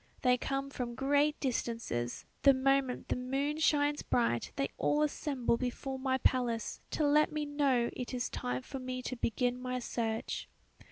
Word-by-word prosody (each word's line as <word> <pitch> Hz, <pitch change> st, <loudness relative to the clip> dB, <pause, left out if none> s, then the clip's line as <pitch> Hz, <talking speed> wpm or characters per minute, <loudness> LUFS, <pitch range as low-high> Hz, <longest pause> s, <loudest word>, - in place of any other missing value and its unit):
They 250 Hz, -1 st, +5 dB
come 275 Hz, +2 st, -2 dB
from 240 Hz, -3 st, -4 dB
great 285 Hz, +3 st, +2 dB
distances; 230 Hz, -, -2 dB, 0.2 s
the 275 Hz, -1 st, +7 dB
moment 265 Hz, -1 st, +1 dB
the -, -, +1 dB
moon 275 Hz, +4 st, -1 dB
shines 295 Hz, -1 st, +3 dB
bright 120 Hz, -, +1 dB
they 275 Hz, -, 0 dB
all 295 Hz, +1 st, +3 dB
assemble 275 Hz, -5 st, 0 dB
before 265 Hz, +2 st, -3 dB
my 260 Hz, 0 st, +1 dB
palace 245 Hz, -3 st, 0 dB
to 305 Hz, -, 0 dB
let 300 Hz, +1 st, +4 dB
me 300 Hz, -1 st, -2 dB
know 275 Hz, -5 st, +2 dB
it 250 Hz, -, -5 dB
is 245 Hz, -2 st, -1 dB
time 125 Hz, +1 st, -3 dB
for 270 Hz, -, -6 dB
me 255 Hz, 0 st, -4 dB
to 255 Hz, -, -3 dB
begin 245 Hz, +1 st, 0 dB
my 255 Hz, 0 st, -2 dB
search. 230 Hz, -2 st, -3 dB
255 Hz, 165 wpm, -33 LUFS, 245-280 Hz, 0.2 s, the